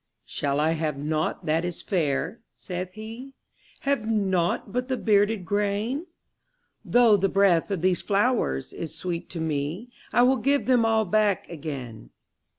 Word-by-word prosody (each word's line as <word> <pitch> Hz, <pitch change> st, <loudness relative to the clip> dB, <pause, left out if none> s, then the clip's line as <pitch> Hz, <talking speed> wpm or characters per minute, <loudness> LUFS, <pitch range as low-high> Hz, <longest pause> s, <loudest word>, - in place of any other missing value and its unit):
``Shall 140 Hz, 0 st, -1 dB
I 155 Hz, +2 st, +2 dB
have 155 Hz, -3 st, -1 dB
nought 155 Hz, +2 st, -2 dB
that 160 Hz, +2 st, +1 dB
is 175 Hz, -1 st, -4 dB
fair?'' 160 Hz, +3 st, -1 dB, 0.2 s
saith 180 Hz, 0 st, -6 dB
he; 225 Hz, +5 st, -9 dB, 0.5 s
``Have 275 Hz, -5 st, +1 dB
nought 195 Hz, -6 st, 0 dB
but 250 Hz, +1 st, -1 dB
the 260 Hz, -1 st, -1 dB
bearded 205 Hz, -3 st, +2 dB
grain? 210 Hz, -, -1 dB, 0.8 s
Though 235 Hz, -3 st, +5 dB
the 195 Hz, 0 st, +1 dB
breath 195 Hz, -4 st, +3 dB
of 190 Hz, -4 st, -2 dB
these 185 Hz, -1 st, +2 dB
flowers 200 Hz, -, 0 dB
is 160 Hz, -1 st, -6 dB
sweet 170 Hz, 0 st, -4 dB
to 170 Hz, -, -6 dB
me, 160 Hz, +9 st, -3 dB, 0.2 s
I 245 Hz, -, +4 dB
will 260 Hz, +2 st, +4 dB
give 280 Hz, +2 st, +1 dB
them 245 Hz, -3 st, +4 dB
all 220 Hz, -1 st, +2 dB
back 210 Hz, 0 st, +1 dB
again.'' 135 Hz, -, -7 dB
195 Hz, 155 wpm, -26 LUFS, 160-225 Hz, 0.8 s, Though